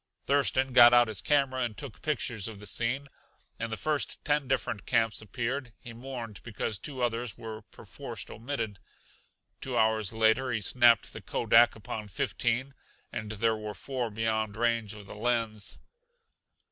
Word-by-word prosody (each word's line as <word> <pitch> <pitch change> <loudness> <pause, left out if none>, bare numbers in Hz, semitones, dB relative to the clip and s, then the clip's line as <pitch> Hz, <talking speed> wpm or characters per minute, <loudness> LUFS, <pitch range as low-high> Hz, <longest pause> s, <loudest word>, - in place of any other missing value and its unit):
Thurston 135 -2 +2
got 120 -1 +9
out 120 -1 +6
his 110 -4 -1
camera 135 -3 +2
and 115 -4 -2
took 140 -6 -7
pictures 120 -8 -1
of 110 -3 -8
the 105 - -10
scene. 120 +7 -1 0.5
In 115 - -2
the 110 - -3
first, 155 -2 -1
ten 145 -2 +1
different 125 -5 -1
camps 115 -3 +2
appeared; 120 +4 -3
he 115 - -10
mourned 120 -4 -7
because 110 -2 -3
two 130 +3 -5
others 120 -2 -1
were 110 -1 -7
perforced - - -8
omitted. 115 -4 -4 0.8
Two 130 -2 -2
hours 110 -3 +2
later 110 +3 +3
he 115 - 0
snapped 120 +2 +4
the 110 - -8
Kodak 115 +3 +4
upon 105 0 -6
fifteen, 120 +7 -1 0.4
and 110 0 -4
there 110 +1 +2
were 105 -1 -6
four 125 +4 -3
beyond 110 -1 -1
range 115 -2 0
of 105 -1 -11
the - - -9
lens. 115 -2 -1
115 Hz, 160 wpm, -29 LUFS, 110-125 Hz, 0.8 s, got